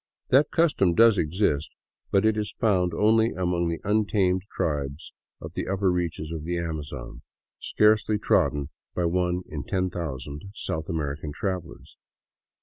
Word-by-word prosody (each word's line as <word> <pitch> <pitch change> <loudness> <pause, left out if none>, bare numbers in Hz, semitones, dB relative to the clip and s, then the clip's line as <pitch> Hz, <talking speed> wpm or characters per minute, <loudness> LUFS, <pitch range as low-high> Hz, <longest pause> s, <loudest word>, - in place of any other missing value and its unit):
That 140 +3 +5
custom 145 - +2
does 115 -1 +6
exist, 80 -2 0 0.4
but 100 +1 +3
it 110 -1 +3
is 105 -1 -3
found 90 -5 +2
only 110 +5 +3
among 90 -2 0
the 85 -1 -2
un 105 +1 +3
tamed 95 -3 +2
tribes 70 -1 -3 0.3
of - - -9
the - - -3
upper 95 -1 +1
reaches 85 -3 -2
of 80 -2 -5
the 85 +2 -2
Amazon, 80 -6 -5 0.4
scarcely 105 0 +3
trodden 75 -7 +1 0.3
by 90 - 0
one 90 +1 0
in 75 -3 -5
ten 95 -1 -1
thousand 75 -2 -5
South 80 -6 -4
American 75 -2 -3
travelers. 90 -2 -5
90 Hz, 145 wpm, -26 LUFS, 80-100 Hz, 0.4 s, does